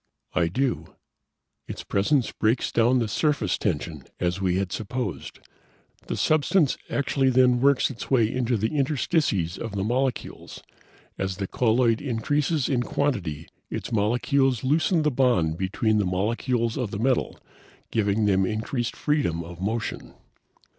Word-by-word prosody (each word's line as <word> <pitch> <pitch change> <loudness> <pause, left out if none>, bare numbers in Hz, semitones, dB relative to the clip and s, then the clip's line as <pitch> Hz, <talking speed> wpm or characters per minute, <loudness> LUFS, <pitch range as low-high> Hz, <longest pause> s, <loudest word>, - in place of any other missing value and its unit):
"I 85 -2 +2
do. 130 +7 -2 0.7
Its - - -6
presence 120 +6 +1
breaks 115 +3 0
down 120 +3 +3
the 115 -3 +1
surface 125 - 0
tension, 80 -6 -2 0.2
as 90 +2 -1
we 90 -2 +1
had 95 -1 -1
supposed. 120 +5 -4 0.7
The - - -3
substance 155 0 +2
actually 135 -1 +1
then 125 -1 +4
works 140 0 +3
its 120 - -8
way 120 -4 +3
into 125 -2 0
the 110 +8 -1
interstices 135 - 0
of 115 -3 -5
the 95 - -1
molecules. 125 +3 -3 0.6
As 95 -1 -2
the 100 - -2
colloid 115 +2 +2
increases 145 +4 0
in 130 -4 +1
quantity, 100 - -2 0.2
its - - -5
molecules 125 +4 +1
loosen 155 +4 +2
the 150 - +2
bond 95 -12 +2
between 105 +3 +1
the 100 - +1
molecules 115 +6 -1
of 125 -5 -2
the 100 - -5
metal, 125 +4 0 0.5
giving 105 0 +1
them 95 -2 +3
increased 110 +4 -2
freedom 135 - 0
of 85 +2 -10
motion. 110 +3 -3
115 Hz, 140 wpm, -25 LUFS, 100-135 Hz, 0.7 s, then